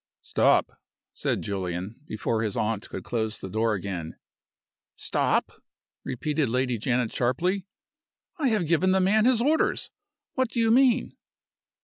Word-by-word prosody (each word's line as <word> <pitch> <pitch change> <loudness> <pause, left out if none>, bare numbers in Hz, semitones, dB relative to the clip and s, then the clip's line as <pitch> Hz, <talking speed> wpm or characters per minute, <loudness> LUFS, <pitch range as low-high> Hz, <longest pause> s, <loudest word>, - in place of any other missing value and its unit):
"Stop!" - - +2 0.3
said - - -1
Julian, 95 +1 -4
before 110 +1 -1
his 110 -3 -2
aunt 110 -1 -1
could - - -6
close 110 -2 -2
the 95 - -8
door 110 +1 +1
again. 90 -4 -5 0.8
"Stop?" - - 0 0.4
repeated 145 +2 -1
Lady 125 -1 0
Janet, 125 0 0
sharply. 180 +11 0 0.7
"I 285 - +2
have 215 -7 +1
given 170 +4 +3
the 190 - +3
man 210 +4 +3
his 245 -2 +4
orders. 310 +4 +1 0.4
What 260 -3 0
do 235 - -3
you 225 -1 +3
mean?" 255 0 +3
125 Hz, 135 wpm, -26 LUFS, -, 0.8 s, his